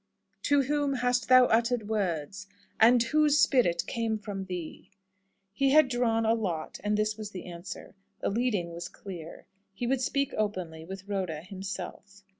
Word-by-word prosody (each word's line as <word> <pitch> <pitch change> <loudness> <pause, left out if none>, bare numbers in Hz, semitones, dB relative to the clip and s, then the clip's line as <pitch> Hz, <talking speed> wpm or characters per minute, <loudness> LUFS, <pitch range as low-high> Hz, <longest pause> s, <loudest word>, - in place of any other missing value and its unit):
"To 285 -1 +4
whom 285 0 0
hast 245 -1 0
thou 255 0 +8
uttered 230 -1 +1
words? 195 -2 -2 0.3
and 235 +2 +6
whose 300 +4 +3
spirit 235 - +3
came 225 -1 -1
from 205 -2 -6
thee?" 180 -3 -7 0.6
He 275 +3 +2
had 310 -3 +6
drawn 230 -2 +1
a 220 - +4
lot, 180 -9 -3
and 210 0 +1
this 215 0 0
was 215 -1 -6
the 190 -3 -8
answer. 175 0 -8 0.3
The - - -1
leading 210 -6 0
was 170 0 -6
clear. 170 -5 -9 0.3
He 240 - -3
would 255 +1 +1
speak 275 +1 0
openly 185 -7 -3
with 190 +2 -8
Rhoda 185 -6 -2
himself. 195 +1 -7
215 Hz, 160 wpm, -29 LUFS, 185-245 Hz, 0.6 s, thou